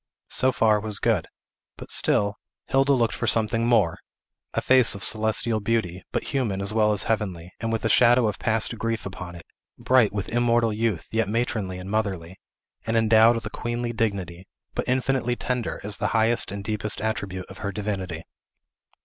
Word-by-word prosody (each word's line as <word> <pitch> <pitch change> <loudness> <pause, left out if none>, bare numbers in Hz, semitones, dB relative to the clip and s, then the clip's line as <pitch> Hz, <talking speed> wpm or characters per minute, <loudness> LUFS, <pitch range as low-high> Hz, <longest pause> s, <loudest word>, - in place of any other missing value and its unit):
So 130 - +4
far 110 -4 +3
was 105 -1 -2
good. - - 0 0.5
But - - -5
still, 100 0 +1 0.3
Hilda 135 +1 +2
looked 115 -4 +1
for 120 - -3
something 115 +2 +1
more; 110 -9 +2 0.6
a - - +2
face 130 -4 +5
of 100 - -7
celestial 110 +1 +2
beauty, 100 -5 -2
but - - -2
human 120 -9 -2
as 100 +1 -1
well 110 -1 +3
as 105 - +2
heavenly, 95 -6 -3
and 115 +1 -3
with 115 - -2
the - - +2
shadow 120 +2 +5
of 105 - -3
past 115 +1 0
grief 115 0 -2
upon 95 -2 -7
it; 85 - -12 0.3
bright 125 -4 +3
with 100 -1 -4
immortal 120 -1 +2
youth, 110 -5 -2
yet 110 -2 0
matronly 110 -5 -2
and 90 +2 -8
motherly; 95 -5 -3 0.5
and 115 0 +1
endowed 110 +1 +5
with 115 -1 -5
a 105 - -5
queenly 120 0 -3
dignity, 95 -6 -3 0.3
but - - -3
infinitely 130 -1 0
tender, 125 -1 -3
as 105 +1 -3
the - - 0
highest 115 0 +2
and 100 0 -6
deepest 105 0 -1
attribute 100 -4 -3
of - - -13
her 100 - -3
divinity. 95 -5 -4
110 Hz, 180 wpm, -24 LUFS, 100-115 Hz, 0.6 s, face